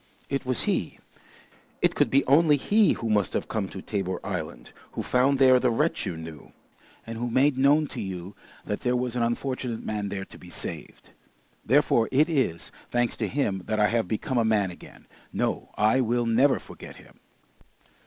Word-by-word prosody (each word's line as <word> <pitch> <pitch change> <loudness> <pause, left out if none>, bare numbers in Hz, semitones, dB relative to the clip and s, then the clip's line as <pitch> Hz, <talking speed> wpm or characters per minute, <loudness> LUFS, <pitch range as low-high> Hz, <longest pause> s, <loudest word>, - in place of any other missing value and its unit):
It 140 -1 -2
was 130 -2 0
he, - - -1 0.9
it - - +4
could - - +2
be 140 +1 +3
only 150 +2 +5
he 210 +8 +3
who 115 - -4
must 105 -3 +1
have - - -2
come 100 -4 -2
to 95 - -8
Tabor 95 -3 -3
Island, - - -5 0.2
who - - -3
found 130 +2 +2
there 130 -1 +6
the 125 - +2
wretch 115 - 0
you 80 - -4
knew, 80 -2 -10 0.5
and 115 0 -6
who 120 +1 -2
made 135 +4 +3
known 140 +4 +4
to 120 - -6
you 95 -1 -6 0.3
that 105 - -3
there 125 -1 0
was 125 -1 -2
an 120 - 0
unfortunate 120 0 -2
man 105 -2 -3
there 100 -1 -4
to - - -14
be 90 - -13
saved. - - -8 0.5
Therefore 125 -3 +3
it 150 +5 +3
is, 130 - -1 0.2
thanks 120 -1 0
to 110 - -1
him, 100 -5 -1
that 110 0 -1
I 105 - +4
have 115 -4 0
become 120 - -1
a - - +3
man 105 -4 +1
again. 85 - -14 0.3
No, - - -2
I 110 +5 +3
will 120 0 0
never 125 +5 +3
forget - - -11
him!" - - -18
120 Hz, 190 wpm, -26 LUFS, 105-130 Hz, 0.9 s, there